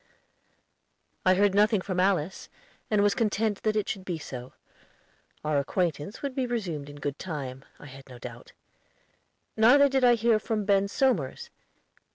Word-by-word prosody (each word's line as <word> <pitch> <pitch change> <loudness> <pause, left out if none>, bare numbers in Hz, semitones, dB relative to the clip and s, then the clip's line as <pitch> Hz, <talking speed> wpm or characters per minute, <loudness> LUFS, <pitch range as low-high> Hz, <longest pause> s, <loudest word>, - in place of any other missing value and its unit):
I 185 - +6
heard 200 +1 +3
nothing 210 +1 +4
from 185 -1 -3
Alice, 185 -2 0 0.4
and 210 -2 +3
was 205 0 +3
content 215 -2 0
that 215 -1 0
it 210 - 0
should 190 - -4
be 180 -3 -3
so. 130 -5 -8 0.9
Our 150 -1 +2
acquaintance 165 - -2
would 280 -2 -2
be 255 -1 -1
resumed 175 -12 -3
in 145 - -10
good 145 -1 -4
time, 135 -6 -6
I - - -13
had 135 -1 -13
no 125 - -10
doubt. 120 0 -10 1.0
Neither 250 +6 +6
did 265 -1 0
I 245 -1 +6
hear 230 -1 +2
from 215 -1 -2
Ben 200 0 +3
Somers. 200 - -1
195 Hz, 160 wpm, -27 LUFS, 150-220 Hz, 1.0 s, I